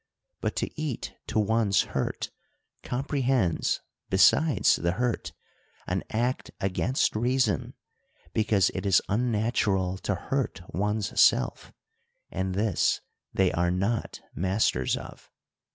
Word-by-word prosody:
But -, -, -2 dB
to 155 Hz, -, -3 dB
eat 145 Hz, -7 st, -3 dB
to -, -, -2 dB
one's 110 Hz, -1 st, +3 dB
hurt -, -, -3 dB, 0.5 s
comprehends, 130 Hz, -, 0 dB, 0.3 s
besides 125 Hz, -, +4 dB
the 85 Hz, 0 st, 0 dB
hurt, 115 Hz, -6 st, -1 dB, 0.5 s
an -, -, -1 dB
act 120 Hz, +4 st, -1 dB
against 100 Hz, +8 st, 0 dB
reason, 120 Hz, -, +1 dB, 0.6 s
because 105 Hz, -4 st, +3 dB
it -, -, -3 dB
is 95 Hz, -4 st, +4 dB
unnatural 105 Hz, -4 st, +1 dB
to 100 Hz, -, -1 dB
hurt 135 Hz, 0 st, -2 dB
one's 105 Hz, +4 st, 0 dB
self; -, -, +3 dB, 0.6 s
and 95 Hz, 0 st, -2 dB
this 105 Hz, -3 st, +1 dB, 0.3 s
they 95 Hz, -2 st, +2 dB
are 85 Hz, +1 st, +1 dB
not 100 Hz, +6 st, -1 dB
masters 95 Hz, -, +1 dB
of. -, -, -11 dB
105 Hz, 110 wpm, -27 LUFS, 95-120 Hz, 0.6 s, besides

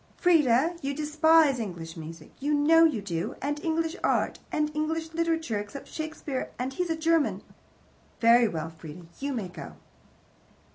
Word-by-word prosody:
"Frieda, 320 Hz, -2 st, +3 dB
you 275 Hz, 0 st, -3 dB
despise 305 Hz, -2 st, +4 dB
English 175 Hz, -7 st, -6 dB
music. 160 Hz, -1 st, -10 dB
You 295 Hz, +2 st, +1 dB
know 325 Hz, +3 st, +6 dB
you 240 Hz, -11 st, 0 dB
do. 175 Hz, +1 st, -3 dB
And 290 Hz, +2 st, -3 dB
English 325 Hz, +1 st, -1 dB
art. -, -, +1 dB
And 300 Hz, 0 st, -1 dB
English 320 Hz, +1 st, -2 dB
Literature, 325 Hz, -9 st, 0 dB
except 210 Hz, +7 st, -8 dB
Shakespeare 310 Hz, -4 st, -4 dB
and 255 Hz, +2 st, -3 dB
he's 355 Hz, +4 st, -2 dB
a 325 Hz, -, +1 dB
German. 325 Hz, -1 st, +1 dB, 0.8 s
Very 235 Hz, +1 st, +6 dB
well, 160 Hz, -4 st, -4 dB
Frieda, 160 Hz, +1 st, -11 dB
you 280 Hz, +1 st, -2 dB
may 225 Hz, -8 st, -3 dB
go." 175 Hz, -3 st, -9 dB
290 Hz, 150 wpm, -27 LUFS, 210-320 Hz, 0.8 s, know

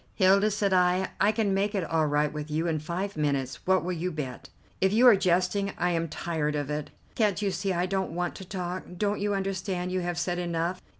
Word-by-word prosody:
"Hilda," 195 Hz, +2 st, +4 dB
said 200 Hz, -1 st, 0 dB
I, 180 Hz, +1 st, +3 dB
"I 205 Hz, +2 st, +5 dB
can 215 Hz, -3 st, 0 dB
make 200 Hz, +2 st, 0 dB
it 195 Hz, -, 0 dB
all 160 Hz, -1 st, +1 dB
right 150 Hz, 0 st, +1 dB
with 150 Hz, 0 st, -5 dB
you 155 Hz, +2 st, -1 dB
in 160 Hz, -2 st, 0 dB
five 180 Hz, +6 st, -4 dB
minutes. 140 Hz, -4 st, -1 dB
What 190 Hz, 0 st, +3 dB
will 180 Hz, -, -2 dB
you 180 Hz, +2 st, -2 dB
bet?" 135 Hz, -6 st, -6 dB, 0.3 s
"If 190 Hz, 0 st, +3 dB
you 230 Hz, +5 st, +4 dB
are 240 Hz, -4 st, +9 dB
jesting, 185 Hz, +2 st, +1 dB
I 175 Hz, 0 st, +1 dB
am 165 Hz, -1 st, 0 dB
tired 150 Hz, -1 st, -2 dB
of 145 Hz, 0 st, -2 dB
it. 150 Hz, 0 st, -3 dB, 0.2 s
Can't 210 Hz, -4 st, +1 dB
you 205 Hz, -2 st, 0 dB
see 195 Hz, +1 st, -2 dB
I 175 Hz, 0 st, +1 dB
don't 190 Hz, 0 st, -1 dB
want 175 Hz, 0 st, -1 dB
to -, -, -8 dB
talk. 180 Hz, -1 st, -4 dB, 0.2 s
Don't 205 Hz, +2 st, 0 dB
you 205 Hz, 0 st, 0 dB
understand 190 Hz, -2 st, -2 dB
you 185 Hz, -, 0 dB
have 175 Hz, -1 st, -3 dB
said 175 Hz, 0 st, -1 dB
enough? 170 Hz, +1 st, -2 dB
180 Hz, 230 wpm, -28 LUFS, 165-195 Hz, 0.3 s, are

